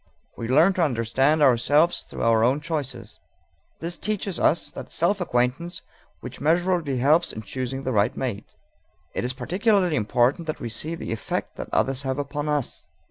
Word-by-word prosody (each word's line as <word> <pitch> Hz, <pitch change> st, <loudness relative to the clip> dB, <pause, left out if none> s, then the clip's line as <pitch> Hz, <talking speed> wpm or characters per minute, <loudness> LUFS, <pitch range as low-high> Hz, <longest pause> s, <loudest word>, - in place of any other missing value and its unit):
We 115 Hz, -, -5 dB
learn 155 Hz, +10 st, +5 dB
to 185 Hz, -, -1 dB
understand 135 Hz, +2 st, +2 dB
ourselves 145 Hz, +6 st, +3 dB
through -, -, -7 dB
our 115 Hz, -1 st, +4 dB
own 130 Hz, +5 st, +3 dB
choices. 150 Hz, -5 st, -5 dB, 0.6 s
This 170 Hz, +1 st, -1 dB
teaches 205 Hz, -3 st, -3 dB
us 165 Hz, -, +2 dB
that -, -, -9 dB
self 185 Hz, +4 st, +1 dB
acquaintance 135 Hz, +3 st, -1 dB, 0.4 s
which -, -, -8 dB
measurably 165 Hz, -2 st, +1 dB
helps 150 Hz, +7 st, +3 dB
in 110 Hz, -, -7 dB
choosing 130 Hz, +5 st, -4 dB
the 130 Hz, -, -1 dB
right 105 Hz, +3 st, +2 dB
mate. 115 Hz, -6 st, -4 dB, 0.6 s
It -, -, -2 dB
is 125 Hz, +1 st, -1 dB
particularly 185 Hz, -, +1 dB
important 125 Hz, -, +1 dB
that 155 Hz, -, -3 dB
we 120 Hz, -, -4 dB
see 155 Hz, +9 st, -2 dB
the 165 Hz, -, -6 dB
effect 110 Hz, -, -4 dB
that -, -, -6 dB
others 135 Hz, 0 st, +1 dB
have 130 Hz, -1 st, -2 dB
upon 145 Hz, +1 st, -3 dB
us. 145 Hz, -4 st, -2 dB
145 Hz, 170 wpm, -24 LUFS, 125-170 Hz, 0.6 s, learn